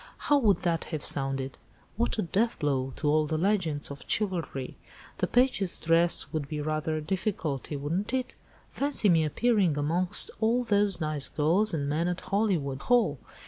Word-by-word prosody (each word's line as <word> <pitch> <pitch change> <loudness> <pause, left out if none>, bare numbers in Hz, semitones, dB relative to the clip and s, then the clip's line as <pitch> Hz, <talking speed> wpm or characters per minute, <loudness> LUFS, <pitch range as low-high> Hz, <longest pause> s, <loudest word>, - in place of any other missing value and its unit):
How 290 -1 +2
would 205 -8 +2
that 170 -2 0
have 155 -4 -5
sounded? 135 -1 -3 0.4
What 230 +3 -1
a 215 - 0
deathblow 145 - 0
to 150 - -3
all 155 +1 +3
the 155 +1 -1
legends 170 -6 0
of 140 - -9
chivalry! 175 -10 -2 0.4
The - - +1
page's 245 -7 +1
dress 165 +1 +2
would 155 -3 -2
be 150 +1 -4
rather 155 +1 -2
a - - -3
difficulty, 160 - -3
wouldn't 165 +10 -2
it? 255 -1 -2 0.3
Fancy 280 -7 +2
me 165 -3 +4
appearing 190 -1 +1
amongst 170 +5 +2
all 230 +3 +2
those 205 -5 +2
nice 155 -3 -2
girls 175 +8 +2
and 145 -4 -2
men 155 +4 0
at 180 0 -2
Hollywood 185 -10 -1
Hall! 220 - +2
165 Hz, 165 wpm, -28 LUFS, 150-205 Hz, 0.4 s, me